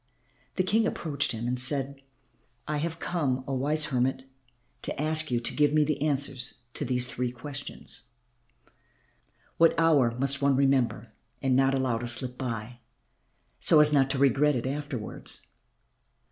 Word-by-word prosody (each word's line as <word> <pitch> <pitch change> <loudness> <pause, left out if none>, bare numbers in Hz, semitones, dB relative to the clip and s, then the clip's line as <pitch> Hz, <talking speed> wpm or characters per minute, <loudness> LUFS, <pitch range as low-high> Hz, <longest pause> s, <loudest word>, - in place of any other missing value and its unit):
The 185 - +1
King 220 +4 +2
approached 145 -8 -1
him 115 +1 -4
and 125 0 -1
said, 135 +1 0 0.7
"I 150 - -1
have 165 +2 -3
come, 140 -8 -1
oh, 135 - -3
wise 150 +4 0
hermit, 130 +1 0 0.6
to - - -5
ask 155 +1 +1
you 120 -1 +1
to 120 - -2
give 150 -1 +2
me 155 0 +4
the 150 0 -2
answers 140 -4 -2
to - - -3
these 125 -1 0
three 125 -1 -3
questions 135 0 -5 1.5
what 165 0 +4
hour 145 -8 +3
must 140 +1 +1
one 140 -1 +3
remember 130 -5 +1 0.3
and 130 -1 +2
not 135 +1 +3
allow 130 -4 0
to 120 - -4
slip 125 +1 0
by, 120 -2 -5 0.8
so 155 - +6
as 150 0 +7
not 135 -2 +3
to 135 - -1
regret 140 +2 +3
it 120 - -3
afterwards? 140 -4 -3
135 Hz, 155 wpm, -27 LUFS, 125-150 Hz, 1.5 s, as